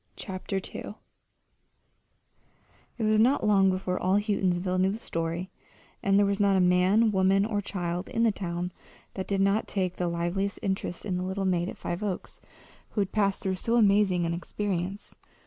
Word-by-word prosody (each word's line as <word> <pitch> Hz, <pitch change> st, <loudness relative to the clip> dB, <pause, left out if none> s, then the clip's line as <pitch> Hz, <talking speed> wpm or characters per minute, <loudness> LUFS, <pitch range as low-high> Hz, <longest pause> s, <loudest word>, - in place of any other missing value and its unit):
CHAPTER 190 Hz, 0 st, -5 dB
II 195 Hz, +2 st, -5 dB, 2.0 s
It 230 Hz, -, -3 dB
was 215 Hz, 0 st, +3 dB
not 245 Hz, +2 st, +3 dB
long 195 Hz, -2 st, +5 dB
before 185 Hz, -1 st, -1 dB
all 185 Hz, +2 st, +2 dB
Houghtonsville 185 Hz, -3 st, 0 dB
knew 190 Hz, -, +3 dB
the 205 Hz, -, -2 dB
story, 170 Hz, -3 st, -3 dB, 0.5 s
and 195 Hz, 0 st, +3 dB
there 205 Hz, -, +5 dB
was 200 Hz, 0 st, 0 dB
not 200 Hz, -1 st, +4 dB
a -, -, +3 dB
man, 185 Hz, +5 st, +4 dB
woman, 195 Hz, +1 st, +3 dB
or 210 Hz, -2 st, -1 dB
child 180 Hz, -2 st, -3 dB
in 230 Hz, -, 0 dB
the 230 Hz, -, +4 dB
town 180 Hz, -2 st, -4 dB, 0.4 s
that 190 Hz, -, -5 dB
did 195 Hz, -1 st, 0 dB
not 200 Hz, +3 st, +2 dB
take 185 Hz, -3 st, -2 dB
the 180 Hz, -, -1 dB
liveliest 175 Hz, +4 st, -1 dB
interest 190 Hz, -3 st, -3 dB
in 185 Hz, -3 st, -1 dB
the 180 Hz, -, -2 dB
little 190 Hz, +1 st, -2 dB
maid 180 Hz, -1 st, +1 dB
at -, -, -8 dB
Five 175 Hz, +3 st, -4 dB
Oaks 200 Hz, -4 st, -4 dB, 0.5 s
who 210 Hz, -, -1 dB
had 195 Hz, -, -2 dB
passed 200 Hz, -2 st, 0 dB
through 190 Hz, -, 0 dB
so 230 Hz, +5 st, -1 dB
amazing 200 Hz, -5 st, +4 dB
an 170 Hz, -, -1 dB
experience. 190 Hz, +2 st, -3 dB
195 Hz, 180 wpm, -28 LUFS, 180-205 Hz, 2.0 s, long